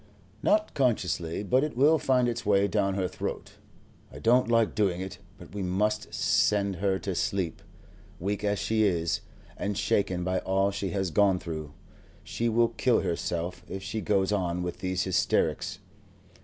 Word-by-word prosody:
"Not 215 0 +2
consciously, 95 - 0
but 130 +7 +2
it 150 -5 -3
will 150 +4 +5
find 130 -2 +2
its 120 0 -2
way 100 -1 +3
down 100 -2 0
her 95 -2 0
throat. - - -6 0.5
I - - -10
don't 120 +1 +3
like 115 -2 +3
doing 95 -5 +1
it, 95 +1 -6 0.2
but 90 -2 -13
we 100 - -4
must 105 +4 0
send 100 -2 +2
her 95 +1 +1
to 95 +1 -4
sleep. 90 -2 -2 0.6
Weak 100 +3 -2
as 105 0 +1
she 110 +2 0
is, 85 -4 +1 0.4
and 100 -1 -2
shaken 90 -3 0
by 95 0 0
all 95 +1 +1
she 100 -1 -3
has 95 -3 -1
gone 100 +1 +4
through, 80 -5 -6 0.5
she 120 0 -1
will 115 +1 +3
kill 120 +1 +2
herself 85 +1 -3
if 95 0 -5
she 110 +2 -3
goes 100 -2 +1
on 90 -3 -1
with 90 -1 -5
these 95 0 -1
hysterics." 95 -2 0
100 Hz, 170 wpm, -28 LUFS, 90-110 Hz, 0.6 s, will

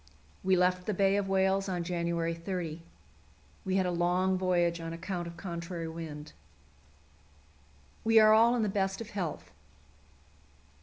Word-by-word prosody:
We 190 0 +3
left 180 0 +1
the 210 - 0
Bay 195 +1 +3
of 200 -1 -1
Whales 195 0 +2
on 175 -2 -2
January 170 -1 -1
30. 170 -2 -5 0.8
We 190 - -1
had 190 -1 +2
a 180 - 0
long 180 +2 +1
voyage 175 -2 +1
on 165 0 -5
account 175 +1 -4
of 170 0 -9
contrary 170 -1 -5
wind. 160 -2 -8 1.7
We 225 0 +4
are 215 0 +7
all 230 +2 +5
in 235 - +1
the - - +1
best 195 -1 -1
of 230 - -8
health. 180 -7 -4
180 Hz, 150 wpm, -30 LUFS, 170-195 Hz, 1.7 s, are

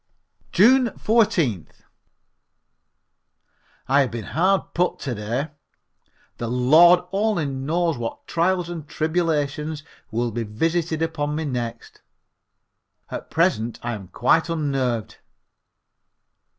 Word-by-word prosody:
June 245 +7 +5
14th. 170 - +1 2.0
I 140 +2 +4
have 135 - +1
been 115 -2 -5
hard 185 +5 +1
put 180 +1 +1
to 135 - -3
day. 115 +8 -3 0.9
The 120 - -3
Lord 155 +9 +6
only 200 -4 0
knows 150 +3 -1
what 115 -1 -5
trials 175 +1 0
and 165 -4 -7
tribulations 155 -2 -1 0.3
will 120 +1 -1
be 115 +2 -3
visited 160 +9 -1
upon 150 -2 -2
me 160 +1 -2
next. 120 -4 -5 1.1
At - - -6
present 160 -10 +1
I 120 0 -2
am 100 -4 -7
quite 160 - +2
unnerved. 135 - -1
150 Hz, 105 wpm, -23 LUFS, 120-170 Hz, 2.0 s, Lord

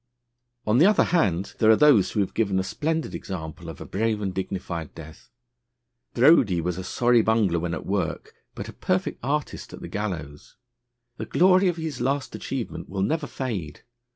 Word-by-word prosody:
On 110 +4 +3
the 170 - +7
other 210 - +4
hand, 100 - +1
there 110 - +4
are 110 - +8
those 125 -9 +5
who 105 - 0
have 95 - -2
given 100 -4 0
a 95 - +1
splendid 160 +10 -2
example 80 -2 -6
of 80 - -9
a - - -7
brave 110 +1 -1
and 100 -2 -3
dignified 90 -4 -5
death. 80 -1 -12 0.9
Brodie 120 - +5
was 90 +1 -2
a - - -5
sorry 120 +5 +3
bungler 110 -6 +2
when 85 0 -2
at - - -7
work, 95 -3 -2 0.2
but - - -6
a - - -9
perfect - - -1
artist 145 +3 -3
at - - -8
the - - -6
gallows. 80 -9 -5 0.6
The - - -5
glory 185 +1 +4
of 175 -1 0
his 160 -5 -4
last 135 0 -1
achievement 130 -4 -5
will 95 0 -2
never 150 +7 -1
fade. 100 - -5
105 Hz, 180 wpm, -25 LUFS, 90-135 Hz, 0.9 s, are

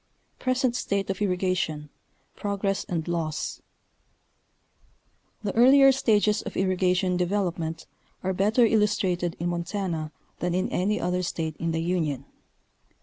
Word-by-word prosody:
PRESENT 255 -1 +1
STATE 200 -4 -1
OF 190 - -5
[RRIGATION—PROGRESS 190 +2 -2
AND 165 -2 -3
LAWS. 165 -3 -3 1.8
The 200 - -2
earlier 270 +3 +7
stages 215 -5 +2
of - - -7
irrigation 185 -1 +1
development 175 -3 -1 0.4
are 190 0 0
better 210 +6 +3
illus 210 -1 +3
trated 175 -2 -1
in 175 +1 -1
Montana 170 -2 -3 0.3
than 175 0 -1
in 185 - 0
any 200 +4 0
other 180 +1 0
State 165 -3 -3
in 165 0 -2
the 165 0 -1
Union. 155 -6 -1
185 Hz, 120 wpm, -26 LUFS, 170-205 Hz, 1.8 s, earlier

